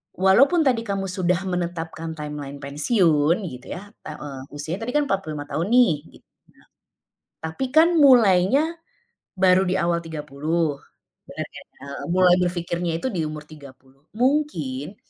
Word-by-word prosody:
walaupun 245 - +4
tadi 245 -4 +2
kamu 195 -2 -2
sudah 180 0 0
menetapkan 165 -2 -4
timeline 150 -2 -6
pensiun 155 - +2
gitu 125 -4 -10
ya 205 +3 -9 0.2
ta 155 - -7
eee, 140 -3 -8
usianya 160 +8 -5
tadi 245 - -3
kan 295 - +2
45 155 -7 -2
tahun 165 +4 -2
nih 245 -9 +6 0.3
gitu - - -38 1.0
ya, - - -67
tapi 160 +11 -3
kan 330 +3 +5
mulainya, 255 - +5 0.6
baru 185 0 +4
di 185 - 0
awal 170 0 +1
30, 155 0 -2 0.5
bener - - -5
nggak 140 0 -11 0.2
mulai 180 -1 +5
berfikirnya 175 -1 -2
itu - - -1
di 170 -4 -1
umur 150 0 -6
30 135 -2 -16
mungkin, 210 - -1
175 Hz, 140 wpm, -23 LUFS, 150-195 Hz, 1.0 s, nih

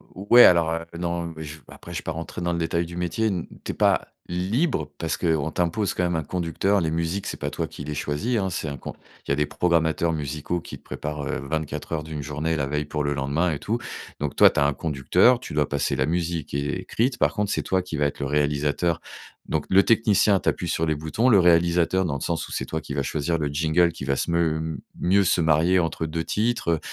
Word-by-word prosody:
Ou 95 +2 -8
ouais 120 0 +10
alors, 85 -2 +5
heu, 85 0 -3
non, 85 0 -2
mais 80 - -7
je 75 +1 -8
ve - - -26
après - - -11
je - - -2
vais - - -12
pas - - -3
rentrer 85 +2 -6
dans 85 0 0
le 85 - -1
détail 85 +1 0
du 85 +1 -9
métier, 90 +6 0
n 95 -5 -2 0.2
tu - - -3
es - - -9
pas - - +2 0.2
libre 90 - 0
parce 80 - -1
qu'on 80 -3 0
t'impose 90 +4 0
quand 90 - -1
même 90 -1 0
un 80 - -1
conducteur. 90 +5 0
Les 80 -3 -1
musiques, 85 +4 -2
c'est - - -3
pas - - -2
toi - - -3
qui - - -9
les 75 +1 -4
choisis, 95 - -1
hein, 95 -3 0
c'est 80 -3 -3
un 70 - -5
con - - -7 0.3
il - - -1
y - - +4
a - - +2
des 75 +1 +1
programmateurs 85 0 +1
musicaux 75 +3 -3
qui - - -9
te - - -29
préparent, 75 -1 -5
heu, - - -2
24 75 +1 -4
heures 80 -2 -1
d'une 80 -1 -6
journée 75 +3 -2
la 70 -3 -1
veille 75 +1 -1
pour 75 0 -2
le 70 0 0
lendemain 70 +6 0
et 75 - -3
tout, 115 +9 -2 0.4
donc 75 -2 -3
toi, - - +8
tu - - -1
as 70 - +4
un 70 - +2
conducteur, 80 - +3
tu 125 - -8
dois 75 -1 +1
passer 70 0 0
la 65 0 +1
musique 85 0 -2
qui 70 - -2
est 90 - -2
écrite, 120 +7 -1
par - - +2
contre, 105 -2 -1
c'est - - -1
toi 95 -1 +1
qui 90 -3 -6
va 75 - +2
être 70 - -2
le 70 - -2
réalisateur, 75 +3 0 0.5
donc - - -1
le 95 +1 +6
technicien, 105 -3 +4
tu - - -9
appuies 90 - 0
sur 80 0 0
les 80 -1 0
boutons, 80 +11 0
le 110 -6 +6
réalisateur, 85 +1 +3
dans 75 - -1
le 70 - -5
sens 85 -1 -2
où - - -9
c'est - - -2
toi 80 - -3
qui 70 - -7
vas 70 -1 -1
choisir 80 +4 -1
le 75 -2 -1
jingle 80 +4 +2
qui 75 - -7
va 70 0 +1
se 85 - -2
m 80 -1 0 0.2
mieux 95 +2 +3
se 90 - +3
marier 80 +3 +3
entre 80 -1 -1
2 80 +1 -3
titres, 115 -1 -1
heu, - - -5
80 Hz, 265 wpm, -24 LUFS, 75-90 Hz, 0.5 s, ouais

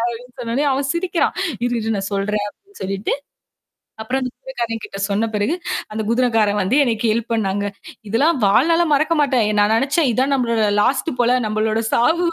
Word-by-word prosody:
அப்டின்னு 250 +2 -14
சொன்னொன்னே, 240 +5 -1
அவன் 270 0 -1
சிரிக்கிறான். 350 0 0 0.3
"இரு, 245 - -2
இரு 220 0 -1
நன் 195 +1 -3
சொல்றேன்" 205 +1 -1
அப்டின்னு 400 - -21
சொல்லிட்டு. 195 +1 -2 0.9
அப்புறம் 260 +4 -1
அந்த 255 0 -3
குதிரக்காரன் 235 - -4
கிட்ட 195 - -9
சொன்ன 210 +3 +1
பிறகு, 210 +11 +1 0.4
அந்த 220 0 -2
குதுரக்காரன் 225 -4 +2
வந்து 230 +9 +1
எனக்கு 230 -1 0
ஹெல்ப் 230 +1 -2
பண்ணாங்க. 200 -2 -1 0.4
இதெல்லாம் 280 +7 +2
வாழ்நாள 330 +12 +4
மறக்க 310 +4 +2
மாட்டேன். 255 -6 +2
நான் 210 +2 +3
நினச்சேன் 280 +3 +2
இதான் 265 +4 +1
நம்மளோட 235 -4 +1 0.2
லாஸ்ட் 265 +6 +1
போல 245 +1 +4
நம்மளோட 215 +1 0
சாவு 330 +9 +3
235 Hz, 165 wpm, -20 LUFS, 215-275 Hz, 0.9 s, வாழ்நாள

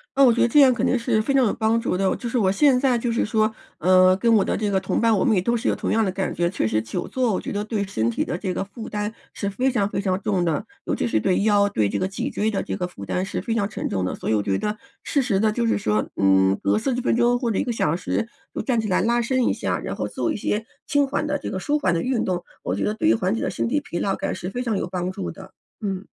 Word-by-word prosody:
嗯， 275 - +5
我 - - +6
觉 235 - +1
得 - - +4
这 265 +5 +4
样 270 -2 +8
肯 245 - 0
定 255 - +2
是 230 -2 +1
非 275 - 0
常 270 -1 +4
有 - - +1
帮 225 +1 +1
助 230 - -1
的， 195 0 +1
我 - - +1
就 240 - -5
是 245 - -1
我 195 -5 +3
现 255 +5 +4
在 260 -2 +2
就 235 0 -1
是 230 - +1
说， 215 0 +1 0.3
嗯， 185 +2 +5
跟 230 +1 +3
我 200 - +3
的 - - 0
这 210 -1 -1
个 195 -1 +2
同 190 - -1
伴 230 -1 +4
我 - - +1
们 220 - +3
也 185 - +2
都 235 +6 +1
是 230 - -3
有 - - +2
同 - - -3
样 225 0 +2
的 190 - 0
感 190 0 -2
觉。 175 - +1
确 180 - 0
实 110 0 +1
久 115 +11 -4
坐 250 -4 0
我 - - -1
觉 - - -5
得 205 0 -2
对 215 -1 -2
身 115 - -1
体 - - -1
的 175 - -3
这 185 0 -3
个 - - -2
负 210 +3 -9
担 210 0 -3 0.2
是 200 - -3
非 255 +7 0
常 205 -5 0
非 - - -2
常 190 -1 -1
重 190 -4 0
的， 165 +3 0 0.2
尤 - - 0
其 - - -1
是 - - +1
对 190 -1 +1
腰， 205 -1 +4
对 110 - 0
这 - - -2
个 185 - 0
脊 230 +8 -3
椎 220 -4 -1
的 200 - -1
这 - - -4
个 180 -2 -2
负 100 - -11
担 180 - -2
是 195 - -4
非 230 - -2
常 205 -3 +1
沉 215 - -4
重 95 -1 -1
的。 - - -2
所 - - -5
以 110 - +3
我 105 - 0
觉 95 - 0
得 210 0 -2 0.3
适 285 - 0
时 210 -7 +1
地 215 +1 +3
就 235 +2 -1
是 225 - +1
说， 105 - 0
嗯， 95 0 +3
隔 100 +1 +2
40 250 -2 -1
分 250 - +1
钟 240 +1 +3
或 240 -2 -1
者 210 - -1
1 - - +1
个 245 - -2
小 165 -9 0
时 185 +5 -2 0.3
就 - - -3
站 245 -4 0
起 220 - -1
来 185 - +2
拉 235 +4 +2
伸 255 +2 +1
一 - - +3
下， - - -2
然 - - -5
后 - - -3
做 335 - -2
一 - - -2
些 210 +1 -1 0.2
轻 285 -1 +2
缓 290 +2 -1
的 290 -1 -1
这 - - -5
个 - - -3
舒 295 +10 0
缓 290 - +1
的 170 - 0
运 255 -3 0
动， 180 -2 -2 0.2
我 - - -2
觉 - - -2
得 210 - 0
对 315 +9 +1
于 - - +5
缓 190 -2 0
解 230 - -2
了 - - -1
身 - - -2
体 290 +5 0
疲 175 - -6
劳 195 +2 0
感 - - -3
是 180 - -6
非 245 - -3
常 230 -5 -1
有 - - -2
帮 180 0 -3
助 90 - -5
的， - - -13 0.3
嗯。 195 -2 -3
210 Hz, 345 characters per minute, -23 LUFS, 185-235 Hz, 0.3 s, 样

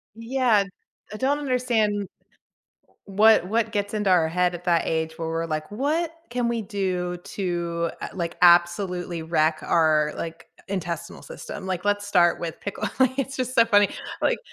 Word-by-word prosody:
Yeah. 230 -2 +2 0.5
I 215 - -5
don't 280 +4 +1
understand 235 -7 0 1.0
what 210 0 +5
what 225 +1 +1
gets 205 -1 -2
into 210 -2 0
our 170 -3 +4
head 180 +1 +1
at 175 +1 -8
that 170 -2 +2
age 160 0 -2
where 165 -1 -3
we're 165 0 -2
like, 155 +2 -4
"What 305 +9 -1 0.2
can 240 -1 0
we 230 -2 -1
do 185 -4 -2
to, 170 -3 -3
uh, - - -4
like, 170 -3 -4
absolutely 175 0 +3
wreck 160 -1 +1
our, 155 -2 +2
like, 165 0 -6 0.2
intestinal 170 -3 -4
system? - - -8
Like, 185 0 -3
let's 205 0 0
start 175 -4 +3
with 165 -2 -5
pickle" 200 - -4
Like, 260 +1 +3
it's 270 0 -2
just 255 0 -3
so 230 - +6
funny, 205 -3 +5 0.3
like - - +2
190 Hz, 165 wpm, -24 LUFS, 170-225 Hz, 1.0 s, so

